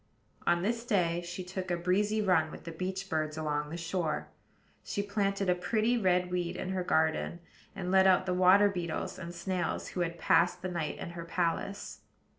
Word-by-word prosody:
On 175 0 +3
this 230 +3 0
day 175 -8 +1
she 175 +2 -6
took 185 0 -5
a 175 - +1
breezy 205 +5 +1
run 170 -5 +3
with - - -10
the 170 - -6
beach 185 +3 -4
birds 155 -2 -1
along 150 -1 -1
the 165 - -5
shore; 165 - -2 0.5
she 200 - -2
planted 200 -1 0
a 180 - +5
pretty 215 +6 +1
red 180 -5 +2
weed 175 0 -1
in 185 - -4
her 190 -1 -1
garden; 160 +1 +1 0.4
and 180 -1 -3
let 190 0 +6
out 185 0 +4
the 180 - 0
water 185 +3 +6
beetles 175 -5 -3
and 170 -1 -6
snails 175 0 -2
who - - -5
had 170 -1 -1
passed 175 +2 +3
the 185 - -2
night 170 -4 -2
in - - -6
her 170 -1 -7
palace. 180 +3 -2
180 Hz, 195 wpm, -31 LUFS, 170-190 Hz, 0.5 s, let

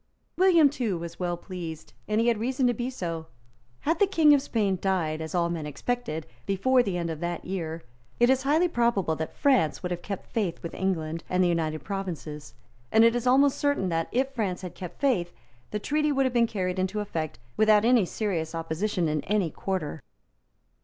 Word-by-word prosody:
William 355 -5 +6
too 245 -9 -1
was 170 0 -7
well 175 -1 -1
pleased; 170 -4 -7
and 215 +1 +1
he 230 - +2
had 230 -3 +2
reason 255 +3 0
to 245 - +3
be 240 +2 -3
so. 165 -10 -4 0.5
Had 325 +3 0
the 405 - +5
King 320 -6 +5
of 285 - +4
Spain 205 -8 0
died, 165 -5 0
as 160 +2 -5
all 170 -1 +2
men 165 -3 -3
expected, 235 - -3 0.2
before 250 +7 +3
the 195 -6 -2
end 170 -1 -2
of 160 - -5
that 175 0 -3
year, 165 -3 -4 0.4
it 240 - +6
is 265 +1 +3
highly 305 +6 +3
probable 235 - +1
that 160 0 -5
France 255 - +2
would 180 - -3
have 175 0 -3
kept 195 0 -5
faith 200 -7 -2
with 170 - -5
England 165 -4 -2
and 185 0 +2
the - - +4
United 160 -2 -1
Provinces; 170 -7 -5 0.4
and 220 - +6
it 230 +1 +5
is 240 +1 -1
almost 270 +2 +4
certain 285 -10 +1
that, 165 -1 0
if 265 +2 +1
France 195 -7 -2
had 180 - -6
kept 180 -2 -9
faith, 220 -12 +1 0.4
the 210 - -2
treaty 300 +7 0
would 270 -1 +2
have 255 - 0
been 235 -1 +4
carried 185 -3 -2
into 190 +3 -1
effect 165 -7 -3 0.2
without 215 0 +5
any 240 -3 +5
serious 170 -4 -2
opposition 165 +3 -1
in 150 -1 0
any 200 -5 +1
quarter. 160 -6 -3
195 Hz, 200 wpm, -27 LUFS, 170-245 Hz, 0.5 s, William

